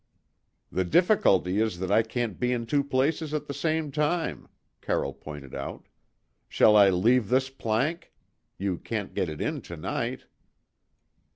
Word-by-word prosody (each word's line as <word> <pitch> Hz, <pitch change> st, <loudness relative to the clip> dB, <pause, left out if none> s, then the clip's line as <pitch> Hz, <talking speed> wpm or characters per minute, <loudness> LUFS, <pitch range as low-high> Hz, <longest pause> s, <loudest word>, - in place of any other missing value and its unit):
"The 95 Hz, -, 0 dB
difficulty 100 Hz, -, +3 dB
is 110 Hz, -5 st, 0 dB
that 95 Hz, +1 st, -3 dB
I 110 Hz, -, +5 dB
can't 115 Hz, -2 st, -3 dB
be 125 Hz, 0 st, +1 dB
in 120 Hz, -2 st, -1 dB
two 140 Hz, +4 st, +1 dB
places 145 Hz, +3 st, 0 dB
at 150 Hz, -, -3 dB
the 140 Hz, -, -5 dB
same 155 Hz, +1 st, -1 dB
time," 150 Hz, -, -1 dB, 0.3 s
Carroll -, -, -1 dB
pointed 75 Hz, -3 st, -10 dB
out. -, -, -6 dB, 0.6 s
"Shall 105 Hz, -, +5 dB
I 100 Hz, -2 st, +7 dB
leave 105 Hz, +4 st, +3 dB
this 130 Hz, +1 st, +2 dB
plank? 135 Hz, +7 st, -2 dB, 0.5 s
You 95 Hz, -3 st, -2 dB
can't 110 Hz, -4 st, -4 dB
get 90 Hz, -, -1 dB
it 75 Hz, -, -7 dB
in -, -, -2 dB
to 85 Hz, -, -9 dB
night." 75 Hz, -, -3 dB
115 Hz, 155 wpm, -27 LUFS, 95-140 Hz, 0.6 s, I